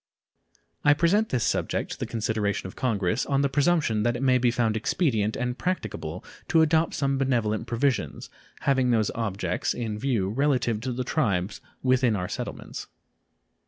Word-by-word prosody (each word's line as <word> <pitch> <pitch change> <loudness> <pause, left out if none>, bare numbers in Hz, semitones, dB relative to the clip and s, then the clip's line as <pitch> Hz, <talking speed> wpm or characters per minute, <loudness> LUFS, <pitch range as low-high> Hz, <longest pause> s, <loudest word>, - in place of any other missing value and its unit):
I 145 0 +6
present 200 +8 +2
this 125 -4 0
subject - - -1
to - - -6
the - - -3
consideration 110 -3 -1
of 95 - -7
Congress 110 -2 0
on 140 0 +1
the 140 - +2
presumption 145 -6 +2
that 120 +2 +1
it 125 - -3
may 130 -1 +4
be 125 0 +3
found 115 -2 +1
expedient 110 - 0
and 125 0 -2
practicable 90 - -3 0.2
to 160 -1 +5
adopt 160 +1 +2
some 140 -1 0
benevolent 115 -4 0
provisions, 115 - -1 0.3
having 135 -2 +2
these 110 -3 +2
objects 95 -5 -2
in 110 -3 -3
view, 115 -8 0
relative 125 -2 +1
to 125 - -3
the 125 +1 -2
tribes 100 - -1 0.2
within 125 -3 +3
our 90 -2 -2
settlements. - - -6
120 Hz, 160 wpm, -26 LUFS, 105-135 Hz, 0.3 s, I